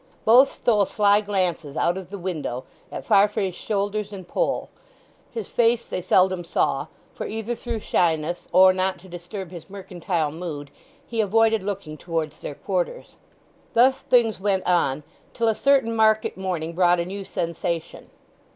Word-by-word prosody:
Both 250 +5 +7
stole 210 -4 +2
sly 205 +1 +3
glances 180 -8 -2
out 175 - +2
of 190 -2 -7
the 200 - -6
window 160 -9 -4 0.3
at - - -6
Farfrae's 200 -1 +3
shoulders 205 +2 -2
and 190 -3 -9
poll. - - -1 0.6
His 450 -2 -6
face 235 0 +2
they - - -4
seldom 185 0 +3
saw, 170 - 0 0.3
for, - - -5
either 225 +2 -3
through 235 -2 -5
shyness, 165 -2 0
or 185 0 +7
not 185 0 -1
to 190 - -14
disturb 175 +1 -8
his 175 +1 -10
mercantile 180 -5 -3
mood, 150 -4 -6 0.3
he 230 -4 -1
avoided 225 +1 +3
looking 190 -6 -5
towards 160 -2 -3
their - - -6
quarters. - - -3 0.6
Thus 260 +3 +5
things 230 -5 +2
went 195 -1 0
on, 150 -5 +1 0.3
till 230 - +1
a 225 - +4
certain 265 -2 +2
market 220 -1 +3
morning 175 -4 -3
brought 175 0 +3
a 170 - -1
new 195 +2 -6
sensation. 170 -2 -4
190 Hz, 155 wpm, -24 LUFS, 175-220 Hz, 0.6 s, Both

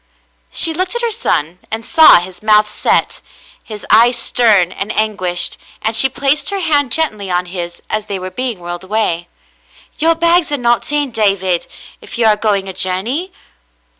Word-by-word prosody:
She 325 - +3
looked 370 +6 -2
at 475 - -3
her 470 - 0
son 180 - -2
and 225 +1 -5
saw 320 -2 +7
his 180 0 -10
mouth 215 0 +3
set, - - 0 0.4
his 215 -2 -9
eyes 235 +3 +5
stern 210 -7 +2
and 200 - -5
anguished, 200 -5 0 0.2
and 220 +1 -1
she 265 +4 +6
placed 275 +4 0
her 400 -1 -3
hand 290 -7 +1
gently 215 -12 0
on 180 0 -1
his 175 -1 -7
as 215 0 -4
they 200 - -3
were 185 0 -7
being 250 -2 -3
whirled 175 +1 -7
away. 185 -4 -2 0.7
"Your 330 +2 +3
bags 335 0 +2
are 290 - 0
not 240 +1 0
in, 290 -3 -1
David, 195 -5 0 0.3
if - - -9
you 235 - +1
are 215 -1 +4
going 205 -2 -1
a 190 - -6
journey." 225 - -2
220 Hz, 175 wpm, -15 LUFS, 190-285 Hz, 0.7 s, saw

